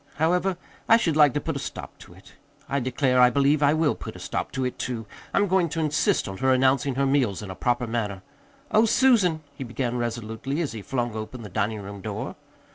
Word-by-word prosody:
However, 180 +4 +1 0.3
I 225 - +8
should 165 -9 0
like 150 -4 +5
to - - +2
put 160 0 -3
a - - -2
stop - - -7
to - - -14
it. - - -17 0.3
I 140 - 0
declare, 125 0 +2
I 125 - +7
believe 140 +3 +2
I 145 +1 +4
will 155 -2 +2
put - - -8
a - - -9
stop - - -3
to 130 -1 -1
it, 125 - -4
too! 115 -3 -3 0.3
I'm 205 - +2
going 185 -2 +2
to 165 - -3
insist 160 - +1
on 95 0 -6
her 130 0 +3
announcing 130 +1 +2
her 140 +1 +1
meals 130 -8 +1
in 100 - -6
a - - -7
proper 120 +3 0
manner. 105 -5 -3 0.5
Oh, 215 +1 +5
Susan," 210 -10 +3
he 140 - -7
began 120 0 -3
resolutely, 120 +4 -3
as 165 -5 -1
he 110 - -7
flung 120 +1 -2
open 110 +3 -6
the 105 - -8
dining 105 +2 -1
room 100 0 -8
door. - - -5
130 Hz, 225 wpm, -25 LUFS, 115-155 Hz, 0.5 s, I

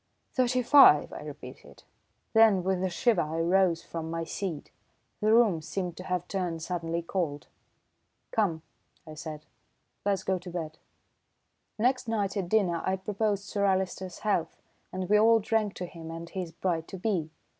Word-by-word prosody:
"Thirty 255 -1 +2
five!" 275 +3 +7
I - - -7
repeated. - - -11 0.5
Then 220 -5 +5
with 190 0 0
a 190 - +1
shiver 195 +2 +2
I 160 +2 -3
rose 175 0 +2
from 165 -1 -6
my 165 0 -2
seat. 165 -2 -5 0.5
The 215 +1 +2
room 220 -8 +4
seemed 175 +2 -4
to 185 - -7
have 180 -1 -2
turned 175 -5 -3
suddenly 170 -1 -3
cold. 165 -5 -2 0.9
"Come," 170 -8 0 0.4
I 155 - -9
said, 155 0 -8 0.6
"let's 200 -1 0
go 190 -1 0
to 180 +1 -9
bed." 160 -3 -5 1.0
Next 250 +2 +1
night 210 -3 -1
at 190 -4 -2
dinner 180 -6 +2
I 190 - +1
proposed 200 +1 -1
Sir 200 0 -2
Alister's 190 -1 -1
health, 200 -6 0 0.3
and 185 0 -3
we 210 +2 +5
all 225 +1 +6
drank 215 -2 0
to 180 - -4
him 165 -2 -10
and 165 +1 -7
his 180 -2 -5
"bride 165 -1 -2
to 190 - -7
be." 180 -5 -1
185 Hz, 165 wpm, -28 LUFS, 165-205 Hz, 1.0 s, five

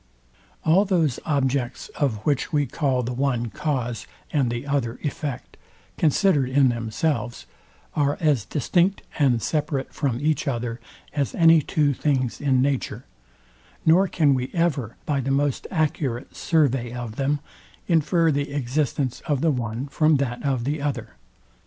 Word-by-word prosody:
All 170 +5 +5
those 170 - +1
objects, 135 -4 -1
of 110 -8 -2
which 145 -3 0
we 145 -2 +2
call 130 -1 0
the 125 +2 -3
one 120 -3 -1
cause 120 -2 -2 0.3
and 135 -5 +2
the 120 +3 -3
other 135 -4 -1
effect, 145 -3 -4 0.4
considered 150 -3 +3
in 135 0 +4
themselves, 120 +2 -2 0.5
are 145 -1 +1
as 150 - +2
distinct 175 - +1 0.2
and 125 -6 +3
separate 145 -3 -1
from 130 -5 -1
each 150 +1 0
other, 120 -2 -2 0.3
as 140 -4 -1
any 165 -1 +6
two 145 0 +1
things 130 -3 -1
in 130 -3 +3
nature, 140 -2 -2 0.8
nor 180 +5 +5
can 150 -6 +3
we 130 -1 -1
ever, 145 -10 0
by 145 -2 0
the 135 0 -2
most 140 0 0
accurate 145 -7 -1
survey 135 -7 +1
of 120 -3 -6
them, 140 +2 +1 0.5
infer 165 0 +3
the 145 0 -1
existence 135 -1 -1
of 145 -3 +1
the 165 - +3
one 120 -1 -3
from 155 +2 +3
that 130 -2 -2
of 135 -4 0
the 145 +3 -2
other. 145 -3 -3
140 Hz, 145 wpm, -24 LUFS, 125-150 Hz, 0.8 s, any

